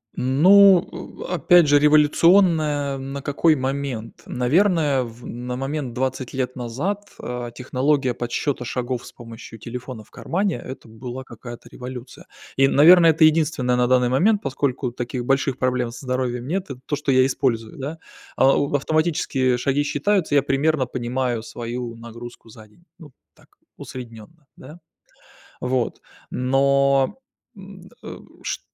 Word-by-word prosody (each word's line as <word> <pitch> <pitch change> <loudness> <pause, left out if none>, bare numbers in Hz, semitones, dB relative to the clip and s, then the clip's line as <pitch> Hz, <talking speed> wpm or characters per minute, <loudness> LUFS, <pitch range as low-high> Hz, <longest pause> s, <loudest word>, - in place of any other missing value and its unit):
Ну, 185 +8 +5 0.4
э, - - -4
опять 175 +1 +5
же, 145 0 +5
революционная 150 -1 +3
на 135 +1 -6
какой 155 +3 +2
момент? 130 -4 -4
Наверное, 150 +1 +2
в 120 0 -11
на 125 +1 -5
момент 135 -1 -4
20 130 0 -3
лет 130 -1 -3
назад, 165 - -4
а, 120 -1 -5
технология 130 +2 0
подсчёта 125 +3 -3
шагов 125 0 -3
с - - -11
помощью 115 -1 -11
телефона 125 0 -8
в - - -26
кармане- 190 +1 -2
это 130 -3 -9
была 125 +3 -8
какая-то 120 -1 -11
революция. 125 0 -9 0.3
И, 135 0 +5
наверное, 165 +5 +7
это 160 0 +3
единственное 155 -5 +3
на 125 0 +2
данный 125 -1 +3
момент, 200 - +2
поскольку 135 -2 -2
таких 120 0 -5
больших 135 0 +1
проблем 125 -1 0
со 120 +3 -10
здоровьем 125 -1 -2
нет. 185 +5 -2
Это 130 -2 -7
то, 145 - -1
что 145 -1 -1
я 130 0 +5
использую, 125 -4 -1
да. 145 +5 -5 0.4
А, 135 +1 +5 0.2
автоматические 145 -4 0
шаги 135 +3 0
считаются, 155 +2 0
я 140 - +4
примерно 140 0 +1
понимаю 125 -1 -2
свою 120 0 -6
нагрузку 115 0 -11
за 110 0 -14
день. 105 +11 -26 0.2
Ну 150 -4 -13 0.2
так, - - -24 0.3
усредненно, 125 +5 -11
да. 150 +6 -13 0.8
Вот, 125 -1 -1 0.3
но, 140 - +2 0.4
м, 195 -1 -13
э, - - -8 0.3
шт - - -3
130 Hz, 140 wpm, -22 LUFS, 125-150 Hz, 0.8 s, наверное